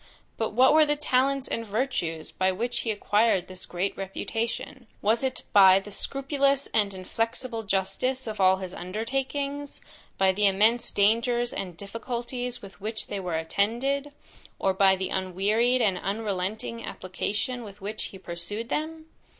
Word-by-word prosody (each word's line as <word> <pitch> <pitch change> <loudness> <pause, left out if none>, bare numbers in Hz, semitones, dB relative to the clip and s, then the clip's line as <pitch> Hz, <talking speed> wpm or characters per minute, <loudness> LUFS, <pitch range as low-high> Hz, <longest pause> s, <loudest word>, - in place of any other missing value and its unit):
But 220 -2 -2
what 260 +5 +6
were 315 0 +7
the 295 -1 +2
talents 275 -1 +1
and 230 - -2
virtues, 200 -8 -2
by 190 0 +1
which 235 +6 -2
he 230 - -3
acquired 210 -2 +2
this 185 0 -7
great 180 +3 -2
reputation? 225 +6 -4
Was 225 +5 +2
it 265 - -2
by 190 -2 +8
the 205 +1 -10
scrupulous 275 +3 +1
and 205 -2 +3
inflexible 225 +5 -2
justice 220 +6 -1
of 215 -3 -3
all 190 0 +6
his 190 -1 -6
undertakings, 270 +9 -3 0.4
by 190 0 +4
the 205 +2 +3
immense 220 +5 +3
dangers 235 +4 +2
and 180 -4 -5
difficulties 240 +4 -4
with 195 0 -12
which 220 +2 -4
they 200 - -3
were 180 -4 -2
attended, 240 - 0 0.5
or 190 - +1
by 190 0 +5
the 190 0 -3
unwearied 210 +7 +1
and 190 -4 +2
unrelenting 210 +2 -3
application 210 +7 -3
with 205 -2 -11
which 210 +2 -5
he 190 - -8
pursued 190 +6 -5
them? 315 +1 -3
220 Hz, 150 wpm, -27 LUFS, 190-250 Hz, 0.5 s, by